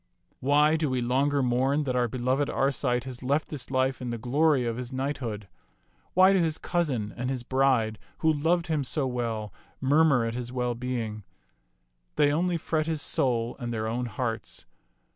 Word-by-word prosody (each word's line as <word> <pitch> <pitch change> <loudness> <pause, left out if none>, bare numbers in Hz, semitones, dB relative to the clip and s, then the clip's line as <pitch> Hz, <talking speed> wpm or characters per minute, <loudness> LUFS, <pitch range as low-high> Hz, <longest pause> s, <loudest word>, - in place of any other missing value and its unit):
Why 150 +3 +4
do 155 -2 0
we 130 -1 0
longer 135 +3 +1
mourn 130 +4 +2
that 130 -3 -2
our 125 -1 +2
beloved 130 +4 0
Arcite 130 -3 0
has 130 -2 -7
left 140 +4 0
this 145 -5 -6
life 130 0 0
in 125 - -3
the 120 - -3
glory 135 +3 +2
of 115 -1 -2
his 125 0 -5
knighthood? 130 -6 -3 0.7
Why 185 +2 +7
do 190 - +3
his 160 -3 +1
cousin 135 - -1
and 125 +1 -3
his 130 -2 -2
bride, 125 -4 +1 0.2
who 160 -1 +2
loved 165 +4 +1
him 155 -4 0
so 135 +2 -1
well, 115 -5 -3 0.3
mur 145 +4 +4
mur 135 -7 +3
at 115 - -2
his 120 0 -5
well 125 -1 -1
being? 115 -3 -4 0.9
They 145 -1 +4
only 175 +2 +1
fret 155 -1 -1
his 160 -2 -1
soul 120 -3 0
and 120 -2 -4
their 110 -1 -2
own 120 +2 -2
hearts. 115 0 -4
130 Hz, 180 wpm, -27 LUFS, 120-145 Hz, 0.9 s, Why